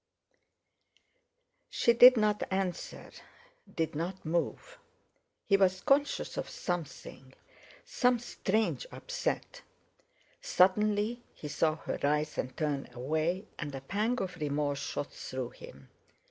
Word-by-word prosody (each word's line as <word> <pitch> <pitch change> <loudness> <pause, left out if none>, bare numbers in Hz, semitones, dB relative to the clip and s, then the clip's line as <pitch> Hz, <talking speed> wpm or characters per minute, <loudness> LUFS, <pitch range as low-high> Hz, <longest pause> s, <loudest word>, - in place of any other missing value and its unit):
'" - - -35 0.7
She 235 - +3
did 250 +2 +9
not 210 -1 +2
answer; 190 -2 -3 0.6
did 160 -1 -1
not 170 +5 -4
move. 170 - -2 0.7
He 195 - +4
was 185 -1 +3
conscious 285 +1 +1
of - - -3
something—some 175 - -3
strange 225 - -1
upset. - - -3 0.8
Suddenly 210 - +2
he 150 - -7
saw 155 +1 +1
her 160 - -5
rise 150 +1 0
and 130 0 -3
turn 145 -4 -1
away, 155 - -1
and 145 -3 -4
a 135 - -6
pang 215 - -1
of 180 -2 -4
remorse 145 -2 -1
shot 145 - -4
through 130 -2 -5
him. 70 -1 -13
180 Hz, 115 wpm, -31 LUFS, 150-220 Hz, 0.8 s, did